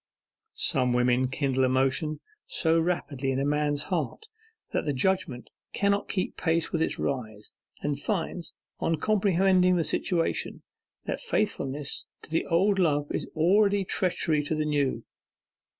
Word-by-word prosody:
Some 130 Hz, -6 st, +2 dB
women 125 Hz, +1 st, +3 dB
kindle 135 Hz, 0 st, 0 dB
emotion 130 Hz, +4 st, +1 dB, 0.3 s
so 165 Hz, 0 st, +2 dB
rapidly 155 Hz, -6 st, -1 dB
in 130 Hz, -, 0 dB
a 135 Hz, -, 0 dB
man's 145 Hz, 0 st, 0 dB
heart 180 Hz, -, -3 dB, 0.5 s
that -, -, 0 dB
the 145 Hz, -, 0 dB
judgment 130 Hz, -4 st, -1 dB, 0.2 s
cannot 200 Hz, 0 st, +1 dB
keep 185 Hz, -, -2 dB
pace 165 Hz, -1 st, 0 dB
with 165 Hz, -, 0 dB
its -, -, 0 dB
rise, 110 Hz, -6 st, -4 dB, 0.3 s
and 145 Hz, -1 st, -1 dB
finds, 175 Hz, -1 st, -3 dB, 0.3 s
on 165 Hz, -, +1 dB
comprehending 185 Hz, -1 st, +3 dB
the 170 Hz, -, +2 dB
situation, 170 Hz, +1 st, -1 dB, 0.4 s
that -, -, -3 dB
faithfulness 150 Hz, -, -2 dB, 0.2 s
to -, -, -13 dB
the 165 Hz, -, 0 dB
old 195 Hz, +4 st, +2 dB
love 145 Hz, -4 st, +1 dB
is -, -, -3 dB
already 200 Hz, +4 st, +3 dB
treachery 170 Hz, -5 st, +1 dB
to 150 Hz, +2 st, -2 dB
the 155 Hz, 0 st, -1 dB
new. 145 Hz, -3 st, 0 dB
155 Hz, 140 wpm, -27 LUFS, 140-185 Hz, 0.5 s, women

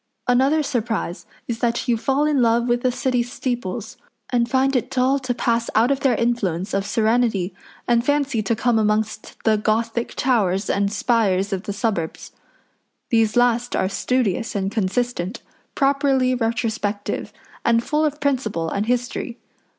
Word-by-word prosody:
Another 270 Hz, +5 st, +3 dB
surprise 225 Hz, -8 st, -2 dB, 0.2 s
is 235 Hz, -1 st, -3 dB
that 240 Hz, +1 st, 0 dB
you 240 Hz, -, +3 dB
fall 270 Hz, +6 st, +1 dB
in 295 Hz, -3 st, +2 dB
love 235 Hz, +1 st, +3 dB
with 240 Hz, 0 st, +1 dB
the 255 Hz, -, +2 dB
City 250 Hz, 0 st, 0 dB
steeples, 240 Hz, -3 st, -4 dB, 0.3 s
and 240 Hz, -1 st, +1 dB
find 270 Hz, +1 st, +2 dB
it 250 Hz, -, 0 dB
dull 265 Hz, +1 st, +2 dB
to 255 Hz, -2 st, -2 dB
pass 235 Hz, -1 st, 0 dB
out 230 Hz, +5 st, +4 dB
of 275 Hz, -, +1 dB
their 270 Hz, -3 st, +2 dB
influence 200 Hz, -6 st, -1 dB
of 195 Hz, 0 st, 0 dB
serenity 220 Hz, -4 st, +1 dB, 0.3 s
and 235 Hz, -1 st, +3 dB
fancy 280 Hz, -4 st, +1 dB
to 220 Hz, +2 st, 0 dB
come 235 Hz, 0 st, +2 dB
amongst 215 Hz, 0 st, -1 dB
the 220 Hz, -1 st, +3 dB
Gothic 225 Hz, +2 st, -1 dB
towers 205 Hz, -7 st, +1 dB
and 200 Hz, 0 st, +1 dB
spires 205 Hz, -4 st, +1 dB
of 190 Hz, -, -2 dB
the 200 Hz, -, -5 dB
suburbs. 200 Hz, -6 st, -3 dB, 0.8 s
These 225 Hz, -2 st, +3 dB
last 245 Hz, 0 st, +2 dB
are 190 Hz, -, +1 dB
studious 225 Hz, +1 st, -1 dB
and 195 Hz, -1 st, -1 dB
consistent, 215 Hz, -1 st, -2 dB, 0.3 s
properly 275 Hz, -2 st, +2 dB
retrospective, 225 Hz, -3 st, -2 dB, 0.3 s
and 230 Hz, 0 st, +3 dB
full 300 Hz, +4 st, 0 dB
of 300 Hz, -1 st, -1 dB
principle 235 Hz, -, -1 dB
and 205 Hz, +2 st, -1 dB
history. 245 Hz, 0 st, -2 dB
235 Hz, 155 wpm, -22 LUFS, 215-255 Hz, 0.8 s, out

